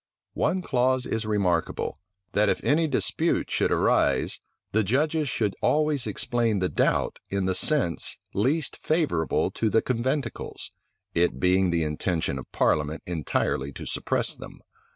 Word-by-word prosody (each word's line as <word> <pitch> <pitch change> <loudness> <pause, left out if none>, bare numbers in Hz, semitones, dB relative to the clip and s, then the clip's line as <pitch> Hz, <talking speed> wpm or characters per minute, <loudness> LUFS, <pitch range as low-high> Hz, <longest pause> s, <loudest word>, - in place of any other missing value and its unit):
One 185 -1 0
clause 130 -2 +1
is 110 -1 -2
remarkable; 95 -6 0 0.3
that 105 +1 +3
if - - 0
any 160 +3 +3
dispute 135 - 0
should - - +1
arise - - +2 0.3
the 110 +1 +2
judges 150 - +1
should 105 -5 -1
always 150 -3 +1
explain 115 -3 0
the 90 -1 0
doubt - - +1
in 100 -1 -1
the 95 - +1
sense 95 - 0 0.2
least 140 +9 0
favorable 150 - 0
to 110 - 0
conventicles, 130 +5 -3 0.4
it 85 0 +1
being 90 +1 +3
the 85 -1 +1
intention 75 -2 -1
of 65 - -11
parliament 75 +1 +1
entirely 75 -4 -1
to - - -8
suppress - - -1
them. - - -11
105 Hz, 135 wpm, -26 LUFS, 90-135 Hz, 0.4 s, that